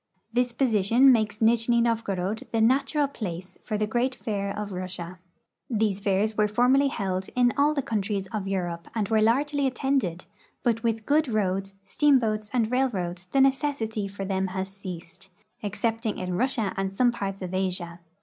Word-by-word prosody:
This 245 0 +2
position 235 +1 +4
makes 215 -3 +1
Nijni 235 +1 +4
NoA'gorod 220 -1 -1
the 225 - 0
natural 275 +6 +3
place 185 -9 -7
for 215 - -2
the 215 - +1
great 245 +4 0
fair 200 -4 -3
of 210 0 -5
Russia. 180 -1 -6 0.5
These 215 -4 0
fairs 200 +2 +1
Avere 210 0 +2
formerly 250 +6 +4
held 190 -7 -2
in 245 -1 +3
all 290 +2 +3
the 280 - 0
countries 205 -3 -2
of 205 -3 -3
Europe 175 -3 -3
and 215 -3 0
Avere 220 -1 +2
largel}'^ 280 +5 +2
attended, 255 -9 -1 0.4
but 235 -2 +2
Avith 225 -2 -1
good 300 +1 +3
roads, 195 -3 -1
steam 285 +7 +4
boats, 215 -3 -1
and 235 -3 +1
railroads 190 -9 -1
the 270 - +4
necessity 265 -6 +1
for 195 0 -6
them 190 0 0
has 190 0 -2
ceased, 190 -1 -9 0.3
excepting 220 +2 -2
in 180 -1 -3
Russia 230 -2 0
and 195 0 -2
some 240 +5 +3
parts 195 -4 -4
of 180 0 -5
Asia. 180 -2 -2
215 Hz, 170 wpm, -26 LUFS, 195-245 Hz, 0.5 s, position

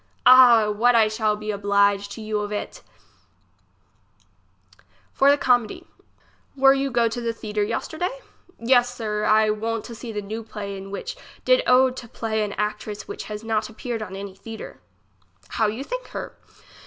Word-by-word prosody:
Ah! 245 -4 +8
what 235 +4 +3
I 225 -2 +5
shall 215 0 0
be 215 0 -4
oblige 200 0 +1
to 220 - -8
you 215 -1 -2
of 205 0 -4
it! 205 - -5 2.3
For 275 - +4
the 285 - +5
comedy. 245 -5 +1 0.7
Were 270 0 +6
you 275 0 -1
go 240 -2 +2
to 240 +2 -4
the 230 -1 -2
theatre 215 -2 -4
yesterday? 315 - -2 0.5
Yes, 245 +1 +3
sir; 210 -2 -2
I 215 0 +4
won't 225 +1 -3
to 235 - -8
see 230 +1 -8
the 210 -1 -4
new 215 +3 -5
play 210 -3 -7
in 195 0 -8
which 200 - -6 0.3
did - - +5
owed 255 0 +4
to 240 - -8
play 220 -1 -2
and 205 -2 -5
actress 210 0 -4
which 410 +1 -7
has 210 0 -7
not 220 -1 -1
appeared 225 +1 -5
on 195 -3 -6
any 195 0 -7
theatre. 225 +3 -10 0.7
How 220 - +1
you 220 +6 -4
think - - -6
her? - - -7
220 Hz, 170 wpm, -23 LUFS, 210-245 Hz, 2.3 s, Ah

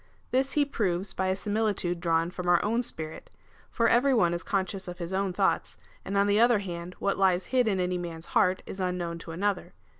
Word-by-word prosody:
This 265 +2 +1
he 295 -1 +3
proves 195 -8 -1
by 190 - -1
a 185 - +1
similitude 205 -4 -1
drawn 165 0 +1
from 180 -1 -3
our 175 -1 +5
own 230 +3 +1
spirit: 160 -10 -4 0.4
for 230 -1 +1
every 260 +3 +4
one 175 -7 +3
is 170 - -2
conscious 190 0 -2
of 175 0 -6
his 170 +1 -5
own 195 0 0
thoughts, 180 - 0 0.3
and 200 - -2
on 200 - +4
the 205 +1 +3
other 235 0 +5
hand 180 -2 -6
what 200 0 -1
lies 185 -1 +3
hid 250 -2 +4
in 195 -3 +1
any 180 0 0
man's 165 -1 -6
heart, 185 +1 +3
is 190 - -8
unknown 180 -2 -2
to 165 - -10
another. 195 +5 -2
190 Hz, 215 wpm, -28 LUFS, 175-210 Hz, 0.4 s, our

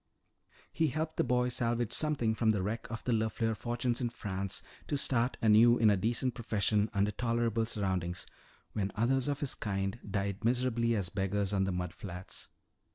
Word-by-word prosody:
He 160 - +2
helped 155 +3 -3
the - - +3
boy 125 0 +2
salvage 120 -2 0
something 145 -8 +1
from 110 0 +1
the 105 -4 +2
wreck 110 +4 -3
of 115 0 -5
the 125 - -1
LeFleur 110 0 0
fortunes 120 +2 -1
in 120 - 0
France 100 -3 -4 0.2
to 145 - 0
start 125 -2 +1
anew 115 +2 +6
in 110 -2 +5
a - - +4
decent 115 +5 0
profession 110 -2 +1
under 100 0 +1
tolerable 115 0 0
surroundings, 95 -5 -1 0.5
when 100 -2 -1
others 125 +5 +2
of 145 -1 -1
his 135 -3 +2
kind 100 0 -2
died 100 +1 -2
miserably 120 -1 +1
as 100 -4 0
beggars 100 +2 -1
on 95 -1 +2
the 95 - -1
mud 90 -1 -3
flats. 90 -1 -7
110 Hz, 175 wpm, -32 LUFS, 100-120 Hz, 0.5 s, anew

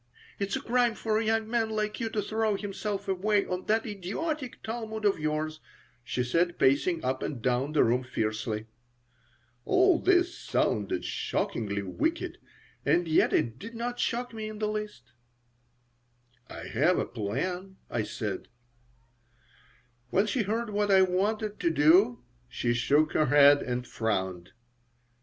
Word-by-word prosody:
"It's 200 0 -1
a - - -3
crime 240 -1 +2
for 220 -1 0
a - - 0
young 220 0 +1
man 225 -1 0
like 215 -1 -2
you 230 -2 -1
to 215 -2 -2
throw 220 0 0
himself 200 0 -4
away 200 +2 +1
on 180 0 -4
that 220 +1 +2
idiotic 240 - -4
Talmud 220 -1 -4
of 200 -4 +3
yours," 155 +1 -2 0.4
she 125 +1 -2
said, 170 +7 +1
pacing 160 +5 +2
up 130 +1 -1
and 135 - -3
down 125 +5 0
the 155 - +5
room 125 +2 +2
fiercely 110 -3 -2 1.0
All 370 - +4
this 360 -1 +3
sounded 100 -4 -1
shockingly 100 -3 -2
wicked, 320 - -2 0.4
and 175 -1 +2
yet 160 - +3
it 115 +1 0
did 230 +7 -9
not 240 +1 -4
shock 245 +1 -1
me 215 -1 -5
in 215 - -8
the 215 0 -1
least 210 - -5 1.4
"I - - -9
have - - +2
a - - 0
plan," 180 - -4
I 120 - -1
said 105 -2 -4 1.6
When 195 - +2
she 225 +4 0
heard 220 +2 -2
what 205 0 0
I 190 -1 +6
wanted 205 +3 0
to 170 - +2
do 150 - +4 0.3
she 120 0 0
shook 145 +6 +2
her 155 - +2
head 145 +1 +7
and 125 0 -3
frowned. 95 -7 -2
190 Hz, 150 wpm, -28 LUFS, -, 1.6 s, head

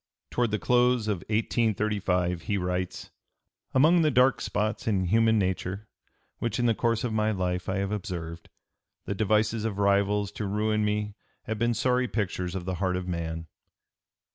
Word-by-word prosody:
Toward 120 -1 +1
the 105 - 0
close 125 -1 +2
of 105 -3 +1
1835 105 -5 0
he 100 +4 -1
writes: 90 -1 -3 0.6
"Among 160 +6 +5
the 155 - +4
dark 130 -1 +3
spots 110 +2 -2
in 95 -4 +1
human 110 +4 +3
nature 95 +1 -2 0.5
which 115 -2 -1
in 120 - +1
the 115 - +4
course 115 0 0
of 120 -3 -1
my 110 0 +1
life 90 -3 -2
I 95 - 0
have 100 0 -1
observed, 85 -5 -5 0.6
the - - -2
devices 110 +2 +1
of 110 -3 -2
rivals 100 0 +2
to 105 - -4
ruin 105 +1 0
me 105 0 -1 0.3
have 110 -1 -4
been 120 0 +1
sorry 125 +1 +1
pictures 90 -5 -2
of 90 -2 -4
the 95 0 -2
heart 90 -2 +1
of 90 0 -3
man.... 80 -2 -3
105 Hz, 165 wpm, -27 LUFS, 95-115 Hz, 0.6 s, Among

